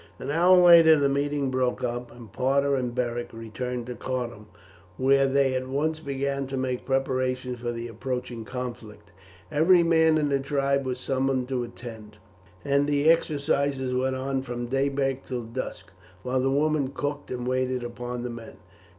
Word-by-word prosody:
An - - -5
hour 175 +4 +5
later 170 -3 +8
the 140 -1 +3
meeting 140 0 0
broke 130 -1 0
up, 120 0 -3
and 115 -4 -13
Parta 140 +2 +1
and 125 -3 -1
Beric 120 -1 -2
returned 120 +2 -5
to 125 - -5
Cardun, 120 -4 -5 0.5
where 135 +1 +4
they 135 -1 +2
at 130 0 -2
once 155 +4 -1
began 140 -2 -2
to 135 0 -4
make 130 -1 -3
preparations 130 -2 -1
for 120 0 -3
the 115 0 -5
approaching 125 0 -5
conflict. 110 -4 -7 0.4
Every 170 +4 +5
man 160 -1 +4
in 150 -1 +1
the 140 -1 +1
tribe 140 0 0
was 125 -1 -3
summoned 130 -1 0
to 130 -2 -1
attend, 110 -3 -10 0.5
and 140 0 +2
the 145 +2 +4
exercises 140 -4 0
went 130 +1 0
on 135 0 -2
from 120 -2 -5
daybreak 135 +1 0
till 125 -2 -3
dusk, 115 -5 -6 0.3
while 130 +1 0
the 135 - +1
women 145 0 +1
cooked 145 +1 -4
and 125 -1 -4
waited 130 -1 0
upon 120 0 -5
the 125 - -4
men. 115 -1 -10
130 Hz, 170 wpm, -26 LUFS, 125-140 Hz, 0.5 s, later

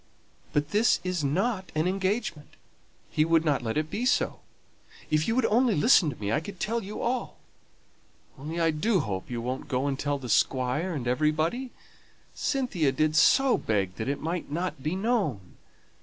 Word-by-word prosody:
"But 145 +1 -1
this 215 +3 +3
is 180 -4 -2
not 190 - -1
an 155 +3 +1
engagement; 190 -4 -2 0.6
he 155 - +2
would 165 0 +2
not 145 -3 +2
let 115 +2 -2
it 155 0 -1
be 225 - -2
so; 255 - +1 0.7
if 155 0 +2
you 225 - +1
would 255 -2 +2
only 235 0 +3
listen 165 - +5
to 140 - -6
me, 105 -2 -3
I 145 - +2
could 190 +4 -9
tell 230 +3 -1
you 205 +1 -6
all. 245 +1 -2 1.0
Only 155 +4 -5
I 165 -1 +3
do 185 +5 +1
hope 95 -7 -4
you 120 -1 -3
won't 130 +4 -4
go 130 -1 -1
and 140 -1 -1
tell 145 0 -1
the 130 -3 -8
Squire 130 +9 +1
and 130 -5 -4
everybody. 155 - 0 0.6
Cynthia 245 - 0
did 155 +3 +1
so 270 - +5
beg 100 -4 -1
that 110 +3 -3
it 140 - -2
might 170 +2 -3
not 170 -1 -3
be 155 +6 -2
known. 190 - -1
155 Hz, 180 wpm, -27 LUFS, 140-205 Hz, 1.0 s, listen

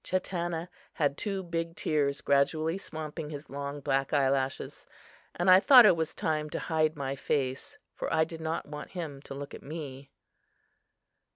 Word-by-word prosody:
Chatanna 175 -2 -2 0.3
had 145 -3 +1
two 195 +3 -3
big 165 -1 -3
tears 145 -4 0
gradually 155 +5 +2
swamping 155 -3 -6
his 145 -2 -8
long, 140 +1 -5
black 135 0 0
eye 140 -2 +4
lashes; 135 -1 -3 0.5
and 175 - -1
I 185 0 +9
thought 250 +2 +9
it 205 - +7
was 160 -1 -2
time 155 -1 -1
to - - -4
hide 155 -2 +1
my 135 -2 -3
face, 130 -1 -2 0.2
for - - -4
I 160 - +4
did 160 0 -7
not 160 +1 -2
want 150 0 -8
him 150 -5 -5
to 135 - -9
look 140 0 -7
at - - -9
me. 140 -3 -7
155 Hz, 170 wpm, -29 LUFS, 140-165 Hz, 0.5 s, I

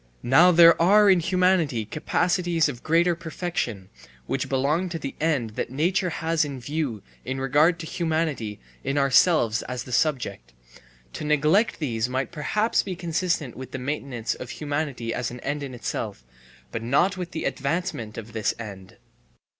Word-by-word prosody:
Now 160 +9 +6
there 170 -1 +7
are 205 +3 +6
in 185 - +5
humanity 175 - +2
capacities 170 - +1
of 125 -4 -6
greater 170 +2 +3
perfection, 160 - -4 0.4
which - - -2
belong 145 +7 +1
to 170 - -4
the 140 -3 -5
end 140 -9 0
that 110 - -4
nature 175 +7 +1
has 165 0 0
in 140 -3 -5
view 130 -5 -3 0.2
in 130 +1 -4
regard 150 +6 +3
to 170 - -7
humanity 155 - -2 0.2
in 140 - -1
ourselves 135 -4 +4
as 125 -1 -5
the 125 - -11
subject: 120 - -1 0.6
to - - -6
neglect 150 +9 +2
these 120 -6 -1
might 130 0 -2
perhaps 210 +9 +1
be 190 -2 -5
consistent 170 -6 -2
with 130 0 -9
the - - -2
maintenance 130 -3 -3
of 125 - -8
humanity 145 -6 -3
as 120 -1 -2
an 125 - -8
end 145 +1 -3
in 135 -3 -6
itself, 90 - -4 0.5
but - - -4
not 140 +11 +2
with 180 -2 -5
the 165 - -5
advancement 140 - -2
of 110 -1 -8
this 110 -3 0
end. 100 -5 -9
145 Hz, 160 wpm, -25 LUFS, 125-170 Hz, 0.6 s, there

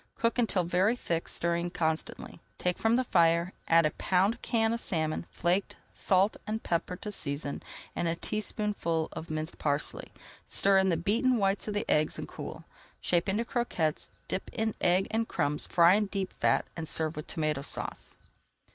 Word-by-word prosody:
Cook 230 +1 +1
until 205 -6 +2
very 185 +7 +2
thick, 170 -8 -2
stirring 170 0 0
constantly. 160 -2 -2 0.2
Take 180 -1 -1
from 225 +1 +3
the 255 - +2
fire, 170 -3 +3
add 165 -1 +5
a 155 - +2
pound 195 +9 +1
can 225 -1 +1
of 235 - -3
salmon, 160 -1 -1
flaked, 180 +3 0 0.2
salt 195 +2 +2
and 220 +1 -3
pepper 170 +1 -1
to 210 +3 -6
season, 140 -5 -2 0.3
and 170 - 0
a 165 - 0
teaspoonful 205 -5 -2
of 160 - -7
minced 155 +1 -4
parsley. 145 0 -1 0.4
Stir 195 -1 +4
in 190 0 +3
the 170 - +2
beaten 230 +9 +2
whites 195 0 0
of 210 - -3
the 205 +3 -1
eggs 155 0 +2
and - - -5
cool. - - -8 0.4
Shape 175 +1 +1
into 215 +4 0
croquettes, 180 -11 -1 0.2
dip 190 - -3
in 220 -1 -1
egg 180 +2 +3
and 225 0 0
crumbs, 150 -3 +1
fry 170 0 +6
in 210 +1 +2
deep 195 -1 -3
fat, - - +2
and 165 -1 -4
serve 160 0 +1
with 150 - -6
Tomato 155 -3 -1
Sauce. - - -5
180 Hz, 175 wpm, -30 LUFS, 165-210 Hz, 0.4 s, fry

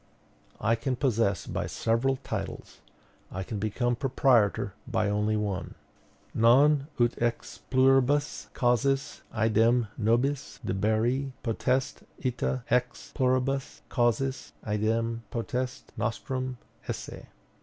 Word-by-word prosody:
I 115 - +2
can 125 +3 -1
possess 115 - +1
by - - -3
several 115 +4 +1
titles; - - -5 0.5
I 95 +1 -4
can 105 +2 -5
become 120 +4 0
proprietor 120 -6 +2
by 110 -4 +1
only 105 +1 +1
one 100 -4 -3 0.6
Non 135 +5 +5
ut 120 0 +2
ex 120 0 -2
pluribus 135 +2 +3
causis 135 +4 +1
idem 115 +1 +3
nobis 120 +6 0
deberi 110 +7 0
potest, 125 +3 0 0.2
ita 130 -1 -1
ex 125 0 0
pluribus 135 +2 0
causis 130 +2 0
idem 115 +2 0
potest 125 +2 -3
nostrum 130 +2 -3 0.3
esse. - - -6
120 Hz, 100 wpm, -28 LUFS, 110-130 Hz, 0.6 s, Non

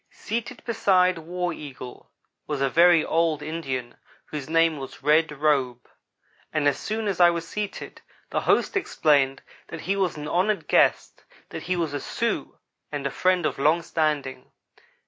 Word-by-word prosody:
Seated 235 +2 -5
beside 185 -6 +2
War 175 +2 -3
Eagle 130 -5 -10 0.4
was 150 -2 -2
a 135 -1 +1
very 170 0 +5
old 160 -2 +1
Indian 135 -6 -4 0.3
whose 150 -1 -7
name 165 -1 +3
was 135 0 -9
Red 155 +2 +3
Robe, 135 -5 0 0.6
and 150 -2 +1
as 145 - +1
soon 220 0 -3
as 195 -3 -2
I 175 -1 +8
was 170 -1 -3
seated. 210 +1 -6 0.3
the - - 0
host - - +2
explained 145 - +2 0.2
that 165 - -8
he 195 +3 -1
was 190 -5 0
an 150 0 -6
honored 195 +6 0
guest; - - +2 0.3
that - - -6
he 185 - -2
was 165 -4 -2
a 145 - -2
Sioux - - -3 0.3
and 145 -2 -4
a 140 - -1
friend 180 +4 +1
of - - -2
long 155 +4 +3
standing. 145 -6 -2
160 Hz, 165 wpm, -25 LUFS, 145-180 Hz, 0.6 s, I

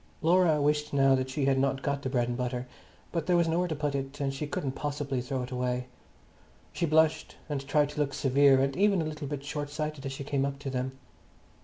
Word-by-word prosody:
Laura 170 -2 +4
wished 150 +1 +1
now 135 -1 +5
that 130 0 0
she 135 +1 -1
had 135 -1 +3
not 135 0 0
got 140 0 -1
the 135 - -3
bread 120 -2 +1
and 120 - -2
butter, 125 0 -2 0.5
but 165 -3 -2
there 180 - +4
was 170 -1 +3
nowhere 175 +2 +1
to 160 - -2
put 145 -1 -1
it, 135 +1 -4
and 135 -1 -1
she 145 +2 -4
couldn't 140 -2 -2
possibly 140 -2 -3
throw 125 +1 -3
it 125 - -8
away. 125 0 -1 0.9
She 170 - 0
blushed 160 0 +2
and 145 -3 -2
tried 145 0 +3
to 150 - -7
look 145 -1 0
severe 135 0 +4
and 135 0 0
even 195 -2 +3
a - - -3
little 150 -2 -5
bit 140 -1 -4
short 145 0 -4
sighted 150 -1 -4
as 135 - -4
she 135 +1 -5
came 140 -1 0
up 140 0 -2
to 140 -1 -5
them. 130 +1 -3
140 Hz, 235 wpm, -29 LUFS, 135-150 Hz, 0.9 s, now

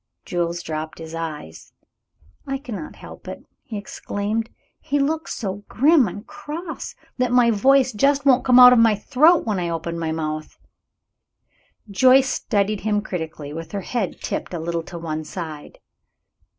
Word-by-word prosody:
Jules 175 -1 -2
dropped 155 +1 -5
his 160 0 -9
eyes. 155 - -7 0.7
"I 270 0 -1
cannot 270 +1 -7
help - - -12
it," - - -7 0.2
he 235 -7 -7
exclaimed. 205 +2 -3 0.3
"He 285 - -1
looks 310 +3 -1
so 200 -1 -5
grim 280 0 +4
and 205 +4 -7
cross 330 +9 -7 0.2
that 250 -1 +1
my 245 -1 +5
voice 260 +4 +3
just 275 +6 +2
won't 265 -2 +5
come 250 -1 +5
out 250 0 +10
of 245 - +5
my 225 -2 +5
throat 295 - +3
when 210 -4 -1
I 175 -1 -2
open 170 0 -4
my 160 -1 -2
mouth." 155 -1 -4 1.3
Joyce 255 +6 +5
studied 205 -3 0
him 210 0 0
critically, 160 -6 -6
with 165 +3 -8
her 200 - -2
head 205 -2 -3
tipped - - -4
a - - -3
little 170 +1 -2
to 175 - -8
one 155 -2 -4
side. 155 -3 -8
205 Hz, 160 wpm, -22 LUFS, 165-255 Hz, 1.3 s, out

